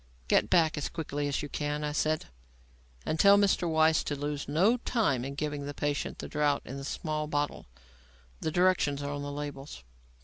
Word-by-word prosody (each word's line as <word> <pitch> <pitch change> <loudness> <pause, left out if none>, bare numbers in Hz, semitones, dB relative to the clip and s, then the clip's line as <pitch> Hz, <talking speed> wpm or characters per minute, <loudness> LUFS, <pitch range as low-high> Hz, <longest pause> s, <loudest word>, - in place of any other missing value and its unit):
"Get - - +3
back 160 -3 +3
as 145 - -3
quickly 145 -3 -3
as 140 0 -1
you - - -4
can," 150 +1 -3
I 150 - -1
said, 155 +1 0 0.8
"and 155 - -1
tell 200 0 +7
Mr. 195 -4 +2
Weiss 160 0 +4
to 145 - -2
lose 145 0 -4
no 185 - +3
time 215 - 0
in 140 +1 -5
giving 145 -1 -3
the 145 - -6
patient 145 0 -2
the - - -6
draught 150 -1 0
in 135 - -6
the 135 - -6
small 155 +1 -3
bottle. 145 - -2 0.7
The - - -1
directions 170 -5 +2
are 145 0 -3
on 145 - -4
the 145 0 -4
labels." 145 - -7
150 Hz, 195 wpm, -29 LUFS, 145-160 Hz, 0.8 s, tell